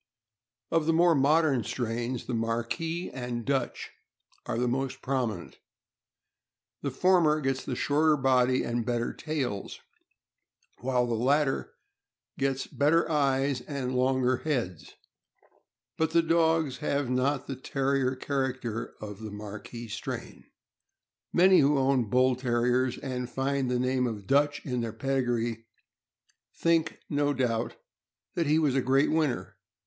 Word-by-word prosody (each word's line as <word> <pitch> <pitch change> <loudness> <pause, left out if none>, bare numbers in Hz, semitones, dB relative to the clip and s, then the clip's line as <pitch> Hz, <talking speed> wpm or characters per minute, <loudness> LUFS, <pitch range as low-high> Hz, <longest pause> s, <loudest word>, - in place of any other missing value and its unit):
Of 165 -1 +1
the 165 - +4
more 170 +1 +5
modern 145 -2 +3
strains, 120 +1 -3
the 125 - -4
Marquis 120 +10 -2
and 125 -2 -4
Dutch 135 -1 -2 0.6
are - - -2
the 125 +1 +1
most 130 +2 -2
prominent. 120 -9 -2 1.2
The 140 - -1
former 160 +1 +3
gets 135 -2 -1
the 125 - -3
shorter 150 +4 +2
body 130 -1 +3
and 120 0 -1
better 120 0 -1
tails, 135 -10 -4 1.0
while 125 0 +1
the 120 - -2
latter 135 +4 +1 0.6
gets 135 -1 0
better 155 +4 +2
eyes 135 -3 +1
and 130 -1 -4
longer 130 0 +2
heads, 115 - -3 1.0
but 160 -1 +2
the 170 0 +5
dogs 160 -3 +2
have 145 -2 -1
not 130 +3 0
the 135 - -5
Terrier 135 0 0
character 130 -4 -3
of 105 -1 -7
the 110 -1 -6
Marquis 105 +3 -8
strain. 105 -1 -6 0.9
Many 185 +1 +6
who 145 +1 +4
own 130 -4 +2
Bull 130 +2 +3
Terriers, 125 0 +1
and 125 -1 -4
find 135 0 -1
the 125 - +1
name 125 0 +1
of 105 -4 -5
Dutch 145 +4 +2
in 125 -3 -1
their 115 -2 -3
pedigree, 120 -2 -1 0.9
think, 165 -1 +1
no 145 0 0
doubt, 120 -3 -1 0.6
that 170 -3 0
he 150 +2 +4
was 150 -4 +2
a 135 - +2
great 135 +3 +3
winner. 155 -6 -1
130 Hz, 135 wpm, -28 LUFS, 120-145 Hz, 1.2 s, Many